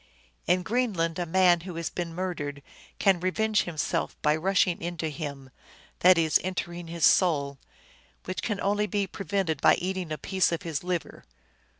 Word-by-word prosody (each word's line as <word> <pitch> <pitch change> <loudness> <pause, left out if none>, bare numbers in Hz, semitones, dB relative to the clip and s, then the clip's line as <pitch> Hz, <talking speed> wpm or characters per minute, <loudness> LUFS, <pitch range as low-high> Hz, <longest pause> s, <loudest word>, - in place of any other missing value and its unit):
" - - -37
In 180 +2 +3
Greenland 185 -7 0
a 175 - -2
man 180 0 +4
who 175 0 -8
has 165 0 -3
been 175 -2 -4
murdered 145 -6 -4 0.3
can 195 -3 +3
revenge 215 +4 +1
himself 160 -4 -2
by 150 0 +4
rushing 185 +1 +1
into 170 -2 -3
him," 140 -4 -7 0.5
that 180 0 +6
is, 160 -2 +3
entering 175 -2 -4
his 165 -2 +1
soul, 140 -6 +3 0.3
" - - -31
which 185 - -4
can 210 -4 -2
only 205 +1 +1
be 200 +1 0
prevented 190 -5 -2
by - - +6
eating 185 -2 -3
a 155 - -2
piece 190 +5 +1
of 170 - -3
his 160 -3 -3
liver." 180 -2 -4
175 Hz, 175 wpm, -27 LUFS, 160-185 Hz, 0.5 s, that